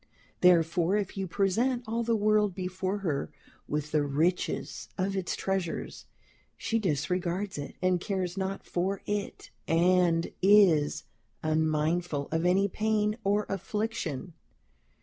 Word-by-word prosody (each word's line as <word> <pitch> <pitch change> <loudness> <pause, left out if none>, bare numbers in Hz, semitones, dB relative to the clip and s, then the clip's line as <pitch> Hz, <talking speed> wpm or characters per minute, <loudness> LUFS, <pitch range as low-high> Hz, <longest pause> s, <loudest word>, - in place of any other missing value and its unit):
Therefore, 175 +1 +4
if 200 -3 -3
you 195 -1 -3
present 225 +8 +1
all 230 +1 -1
the 230 0 +1
world 210 -2 +2
before 185 +1 -2
her, 145 -5 -1 0.4
with 150 0 -3
the 155 - +3
richest 155 +6 -1
of 195 +1 -1
its 190 -2 -2
treasures, 190 -3 -3 0.5
she 225 - 0
disregards 180 +1 -1
it, 145 - -7
and 180 -1 +2
cares 185 -3 -2
not 195 0 -3
for 190 +3 -2
it, 205 -1 -4 0.2
and 170 0 +3
is 180 -7 +5 0.4
unmindful 155 0 0
of 165 +2 +1
any 195 +2 +3
pain 210 +1 0
or 205 +1 +1
affliction. 195 - -3
185 Hz, 125 wpm, -29 LUFS, 165-200 Hz, 0.5 s, is